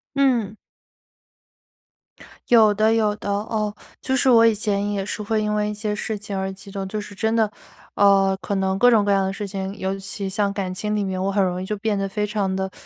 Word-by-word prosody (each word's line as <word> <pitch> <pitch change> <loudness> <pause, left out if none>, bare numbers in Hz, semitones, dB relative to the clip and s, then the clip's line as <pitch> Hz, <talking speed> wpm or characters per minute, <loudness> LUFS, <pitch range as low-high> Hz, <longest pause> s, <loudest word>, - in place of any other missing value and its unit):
嗯。 240 -7 +1 1.9
有 220 -3 +6
的 215 +2 +3
有 215 -2 +2
的， 205 - -6
哦， 210 +1 -2 0.3
就 265 - -1
是 265 0 +3
我 230 -2 +7
以 225 - +3
前 205 -1 -1
也 200 -2 -2
是 210 - -4
会 215 +1 0
因 210 0 -1
为 210 0 0
一 - - -3
些 210 0 -3
事 215 +1 -3
情 205 -1 -6
而 190 0 -2
激 195 +1 -13
动， 195 -1 -4
就 210 +2 -4
是 205 - -10
真 220 +3 0
的， 220 -2 +2 0.4
呃， 195 -1 +4
可 200 - -2
能 190 0 0
各 245 - +6
种 225 -4 +4
各 205 - +1
样 195 -1 +3
的 190 - -2
事 205 +1 -5
情， 195 0 -5
尤 190 0 -3
其 195 0 -5
像 200 0 0
感 190 -2 -3
情 210 +3 -2
里 210 - 0
面， 190 -1 -3
我 195 - 0
很 200 0 +2
容 180 -1 -1
易 - - -4
就 210 - -2
变 210 0 -1
得 195 - -1
非 210 +2 -2
常 205 -2 -1
地 190 0 -2
205 Hz, 250 characters per minute, -22 LUFS, 195-215 Hz, 1.9 s, 我